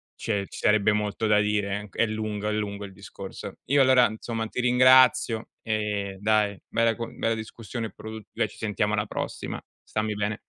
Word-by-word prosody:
c'è 100 Hz, -3 st, -2 dB
ci -, -, -10 dB
sarebbe 105 Hz, 0 st, +3 dB
molto 105 Hz, +1 st, -1 dB
da 105 Hz, -1 st, +5 dB
dire 105 Hz, -1 st, 0 dB
eh, 105 Hz, -, -11 dB
c -, -, -17 dB
è -, -, +4 dB
lungo, 110 Hz, -1 st, -3 dB
è -, -, 0 dB
lungo 105 Hz, -1 st, -3 dB
il 95 Hz, -, -11 dB
discorso. -, -, -9 dB
Io 140 Hz, +1 st, +4 dB
allora, 130 Hz, -2 st, +6 dB
insomma, 110 Hz, +1 st, -4 dB
ti 125 Hz, -, -3 dB
ringrazio, 125 Hz, -2 st, +5 dB
ehm, 105 Hz, -3 st, -2 dB
dai, 105 Hz, -1 st, +2 dB
bella 115 Hz, 0 st, +2 dB
co 115 Hz, -1 st, -4 dB
bella 115 Hz, 0 st, 0 dB
discussione 110 Hz, 0 st, -6 dB
produ 110 Hz, 0 st, -8 dB
beh -, -, 0 dB
ci -, -, -15 dB
sentiamo 105 Hz, 0 st, -1 dB
alla 105 Hz, 0 st, +1 dB
prossima. -, -, -4 dB, 0.2 s
Stammi 110 Hz, 0 st, -2 dB
bene. 105 Hz, +1 st, -2 dB
110 Hz, 190 wpm, -26 LUFS, 105-115 Hz, 0.2 s, allora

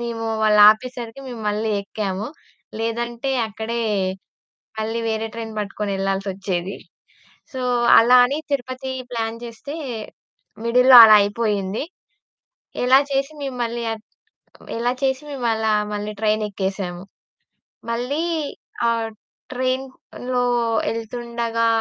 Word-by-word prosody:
మేమూ 230 Hz, -1 st, -4 dB, 0.2 s
వాళ్ళాపేసరికి 220 Hz, +4 st, +4 dB
మేము 235 Hz, -3 st, -7 dB
మళ్ళీ 215 Hz, +1 st, -1 dB
యెక్కాము. 200 Hz, 0 st, -4 dB, 0.5 s
లేదంటే, 235 Hz, +3 st, -2 dB, 0.2 s
అక్కడే 225 Hz, +2 st, -3 dB, 1.0 s
మళ్ళీ 225 Hz, +2 st, -2 dB
వేరే 220 Hz, 0 st, -1 dB
ట్రైన్ 225 Hz, -1 st, -6 dB
బట్టుకొనెళ్ళాల్సొచ్చేది. 195 Hz, -2 st, -3 dB, 0.8 s
సో, 260 Hz, -, -5 dB, 0.4 s
అలా 240 Hz, +2 st, +6 dB
అని 275 Hz, +4 st, -1 dB
తిరుపతీ 260 Hz, -1 st, -3 dB, 0.2 s
ప్లాన్ 225 Hz, -1 st, -2 dB
చేస్తే 235 Hz, +5 st, -8 dB, 0.9 s
మిడిల్‌లో 250 Hz, +2 st, +7 dB
అలా 215 Hz, -1 st, +9 dB
అయిపోయింది. 205 Hz, 0 st, -1 dB, 1.0 s
ఎలా 260 Hz, +2 st, +7 dB
చేసి 275 Hz, +2 st, 0 dB
మేము 270 Hz, -3 st, -4 dB
మళ్ళీ 235 Hz, 0 st, -3 dB
ఆహ్, 220 Hz, -, -9 dB, 0.8 s
ఎలా 240 Hz, +2 st, +1 dB
చేసి 265 Hz, +1 st, 0 dB
మేమలా 225 Hz, -5 st, 0 dB, 0.2 s
మళ్ళీ 210 Hz, +1 st, -4 dB
ట్రైనెక్కేసాము, 195 Hz, -4 st, -1 dB, 0.9 s
మళ్ళీ 250 Hz, +7 st, -1 dB, 0.7 s
ఆహ్, 230 Hz, -1 st, -1 dB, 0.4 s
ట్రైన్‌లో 255 Hz, -1 st, -2 dB, 0.4 s
యెళ్తుండగా 230 Hz, 0 st, -2 dB
230 Hz, 95 wpm, -22 LUFS, 210-245 Hz, 1.0 s, అలా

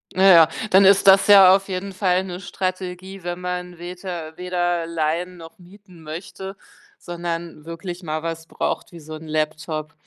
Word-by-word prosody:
Na 190 Hz, -, +2 dB
ja, 165 Hz, -2 st, +8 dB, 0.2 s
dann 190 Hz, +1 st, +6 dB
ist 200 Hz, +1 st, +5 dB
das 195 Hz, 0 st, +6 dB
ja 195 Hz, -2 st, +8 dB
auf 195 Hz, 0 st, -2 dB
jeden 195 Hz, +1 st, -5 dB
Fall 185 Hz, -1 st, +1 dB
'ne 180 Hz, -1 st, -7 dB
Strategie, 185 Hz, 0 st, -5 dB
wenn 175 Hz, 0 st, -4 dB
man 180 Hz, -1 st, -5 dB
weter 175 Hz, -2 st, -7 dB
weder 175 Hz, -2 st, -1 dB
leihen 170 Hz, +2 st, -2 dB
noch 165 Hz, +1 st, -13 dB
mieten 185 Hz, -1 st, -17 dB
möchte, 185 Hz, +5 st, -8 dB, 0.4 s
sondern 170 Hz, -2 st, -6 dB
wirklich 170 Hz, +2 st, -7 dB
mal 155 Hz, -2 st, -4 dB
was 165 Hz, 0 st, -5 dB
braucht -, -, -3 dB
wie 170 Hz, -, -11 dB
so 155 Hz, +1 st, -10 dB
'n 155 Hz, +1 st, -9 dB
Laptop. 155 Hz, 0 st, -3 dB
175 Hz, 165 wpm, -22 LUFS, 165-185 Hz, 0.4 s, ja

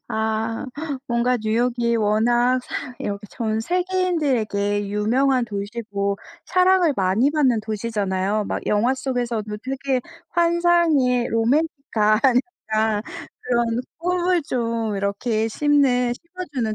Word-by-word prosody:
아 220 Hz, +2 st, -2 dB, 0.4 s
뭔가 240 Hz, +1 st, +2 dB
뉴욕이 235 Hz, +2 st, +1 dB
워낙 240 Hz, +4 st, +2 dB
사 250 Hz, -, -6 dB
이렇게 205 Hz, +1 st, -4 dB
전 220 Hz, -2 st, -2 dB
세계인들에게 275 Hz, -, 0 dB
유명한 245 Hz, +5 st, +2 dB
도시고 200 Hz, -1 st, -3 dB, 0.3 s
사랑을 365 Hz, -3 st, +3 dB
많이 195 Hz, +9 st, +2 dB
받는 265 Hz, -7 st, +2 dB
도시잖아요. 210 Hz, -2 st, -1 dB
막 -, -, -3 dB
영화 220 Hz, +5 st, +2 dB
속에서도 240 Hz, -5 st, -3 dB
되게 265 Hz, 0 st, -1 dB, 0.3 s
환상의 340 Hz, -8 st, +3 dB
로맨틱한 230 Hz, -3 st, +1 dB, 0.5 s
약간 215 Hz, -1 st, +1 dB, 0.4 s
그런 240 Hz, -1 st, +1 dB, 0.3 s
꿈을 355 Hz, 0 st, +1 dB
좀 230 Hz, -5 st, -2 dB
이렇게 215 Hz, +3 st, -1 dB
심는 250 Hz, -1 st, +2 dB
심어주는 295 Hz, -9 st, -4 dB
235 Hz, 245 characters per minute, -22 LUFS, 215-275 Hz, 0.5 s, 사랑을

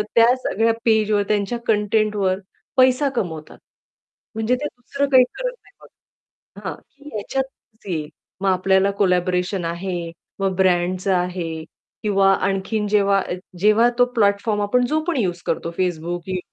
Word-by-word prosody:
त्या 235 Hz, +2 st, +6 dB
सगळ्या 225 Hz, -2 st, +1 dB
पेज 220 Hz, -2 st, +3 dB
वर 205 Hz, -1 st, +3 dB
त्यांच्या 210 Hz, +2 st, 0 dB
कंटेंटवर 210 Hz, -3 st, +1 dB, 0.4 s
पैसा 260 Hz, +2 st, +4 dB
कमवतात. 160 Hz, -8 st, -4 dB, 0.8 s
म्हणजे 225 Hz, +3 st, +1 dB
ते 280 Hz, +4 st, -5 dB
दुसरं 280 Hz, +3 st, -3 dB
काही 260 Hz, -2 st, +7 dB
करत -, -, -2 dB
नाही -, -, -23 dB
बघा. -, -, -16 dB
हां, -, -, -5 dB
की 285 Hz, +1 st, -16 dB
ह्याच्यातच 235 Hz, 0 st, -5 dB
येईल, 155 Hz, -3 st, -3 dB, 0.3 s
मग 195 Hz, -, +2 dB
आपल्याला 190 Hz, +1 st, +3 dB
कोलॅबोरेशन 180 Hz, 0 st, +1 dB
आहे, 170 Hz, 0 st, -3 dB, 0.3 s
मग 195 Hz, -1 st, 0 dB
ब्रँडच 185 Hz, 0 st, +1 dB
आहे. 180 Hz, -3 st, -1 dB, 0.4 s
किंवा 195 Hz, -2 st, +4 dB
आणखीन 195 Hz, +3 st, -1 dB
जेव्हा 200 Hz, -1 st, +4 dB
अ, -, -, -4 dB, 0.3 s
जेव्हा 215 Hz, +5 st, +5 dB
तो 245 Hz, -, +7 dB
प्लॅटफॉर्म 205 Hz, 0 st, +2 dB
आपण 245 Hz, +5 st, +2 dB
जो 310 Hz, +4 st, +1 dB
पण 335 Hz, -5 st, 0 dB
यूज 180 Hz, -6 st, -1 dB
करतो 165 Hz, +1 st, -1 dB
Facebook 175 Hz, -1 st, -1 dB
YouTube, 190 Hz, -, -3 dB
यू 185 Hz, -, -1 dB
200 Hz, 150 wpm, -21 LUFS, 180-230 Hz, 0.8 s, काही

